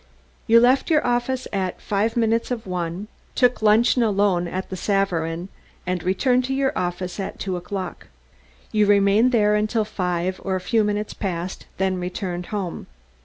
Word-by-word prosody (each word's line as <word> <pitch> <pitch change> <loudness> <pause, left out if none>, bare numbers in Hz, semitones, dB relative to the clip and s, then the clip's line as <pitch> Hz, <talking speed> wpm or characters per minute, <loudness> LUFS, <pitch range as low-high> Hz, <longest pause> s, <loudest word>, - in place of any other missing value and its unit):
You 230 0 +7
left 255 +6 +3
your 310 -2 +3
office 245 +1 0
at 190 -2 -2
five 210 +3 -1
minutes 230 0 +1
of 240 -3 -3
one, 180 +1 -4 0.3
took 250 -2 +3
luncheon 220 +4 +4
alone 200 -5 +2
at 185 +3 -5
the - - -2
Savarin, 175 -3 -1 0.4
and 180 -1 -1
returned 245 +8 +2
to 265 +1 -2
your 270 0 0
office 180 +1 -3
at 195 - -4
two 190 -2 -3
o'clock. 185 +1 -5 0.6
You 210 -2 +3
remained 205 +4 +4
there 210 -3 +3
until 215 +1 +1
five, 180 -3 -2
or 190 -1 -1
a - - -1
few 220 +4 +1
minutes 210 0 -2
past, 180 -2 -4
then 190 -1 0
returned 180 -1 -4
home. 195 -5 -4
200 Hz, 165 wpm, -23 LUFS, 180-225 Hz, 0.6 s, You